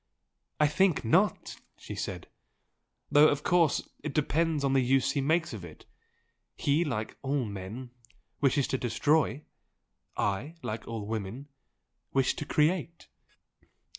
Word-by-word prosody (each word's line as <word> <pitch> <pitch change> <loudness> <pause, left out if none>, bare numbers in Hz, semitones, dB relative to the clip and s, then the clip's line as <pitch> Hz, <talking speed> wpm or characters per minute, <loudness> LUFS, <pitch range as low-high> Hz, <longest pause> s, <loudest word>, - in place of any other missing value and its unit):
"I 150 - +5
think 170 -1 +2
not!" 110 - +2 0.2
she - - -8
said - - -5 0.9
"Though 150 +1 +7
of 145 0 0
course 175 -3 +2 0.2
it 150 -2 -4
depends 155 0 +1
on 135 -1 +2
the 135 - +4
use 130 +1 +2
he 140 - 0
makes 160 +1 +1
of 105 -5 -7
it. 80 -3 -12 0.7
He 150 +4 +2
like 110 -9 -3
all 135 -1 0
men 105 +5 -7 0.5
wishes 140 -1 +2
to 130 - 0
destroy; 145 +5 +1 0.7
I, 110 +11 -1
like 110 -1 -5
all 115 -3 -4
women, 110 +6 -5 0.6
wish 135 -1 +2
to 150 - -4
create!" 165 +3 0
140 Hz, 135 wpm, -29 LUFS, 115-155 Hz, 0.9 s, Though